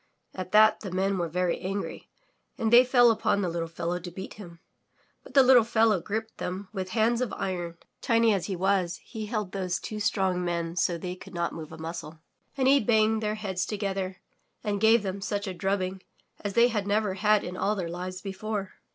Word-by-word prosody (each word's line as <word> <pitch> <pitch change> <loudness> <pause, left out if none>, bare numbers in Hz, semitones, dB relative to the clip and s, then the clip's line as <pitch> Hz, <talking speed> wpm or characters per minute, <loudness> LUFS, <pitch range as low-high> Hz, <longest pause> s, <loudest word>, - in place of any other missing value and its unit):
At 185 -1 -6
that 215 +1 +6
the 195 - -6
Men 190 +1 0
were 170 - 0
very 180 +1 0
angry 195 +2 -4 0.5
and 225 0 0
they 245 +1 +9
fell 245 -2 +5
upon 205 -2 +1
the 180 - 0
little 165 0 -3
fellow 170 +1 -3
to 175 +1 -7
beat 190 +2 -8
him. 175 -5 -12 0.6
But - - -16
the 270 - +8
little 255 -2 +7
fellow 225 -3 +3
gripped 220 +4 -4
them 185 +2 -4
with 190 -2 -4
hands 230 +2 +3
of 250 - -1
iron. 175 -3 -3 0.2
Tiny 230 -1 +3
as 195 -3 -1
he 195 - -2
was, 185 -1 0
he 220 -3 -6
held 210 -4 -3
those 185 -2 -2
two 215 - -6
strong 190 -3 +1
men 170 -1 -2
so 180 -2 +1
they 180 +2 -5
could 190 0 -12
not 170 0 -1
move 160 -2 -8
a 160 - -9
muscle. 160 0 -7 0.4
And 260 -1 +2
he 280 +1 +6
banged 220 -1 +2
their 210 0 -1
heads 190 -4 -3
together, 195 -2 -3 0.5
and 205 -2 -1
gave 225 0 +5
them 195 0 -4
such 205 +1 -2
a 190 - -4
drubbing 190 +1 -2 0.4
as 205 -1 -2
they 235 +3 +5
had 210 -4 -2
never 205 -1 +1
had 210 +2 +3
in 180 - -5
all 205 +3 0
their 185 -4 -3
lives 180 +2 -5
before. 200 0 -4
195 Hz, 210 wpm, -27 LUFS, 180-215 Hz, 0.6 s, they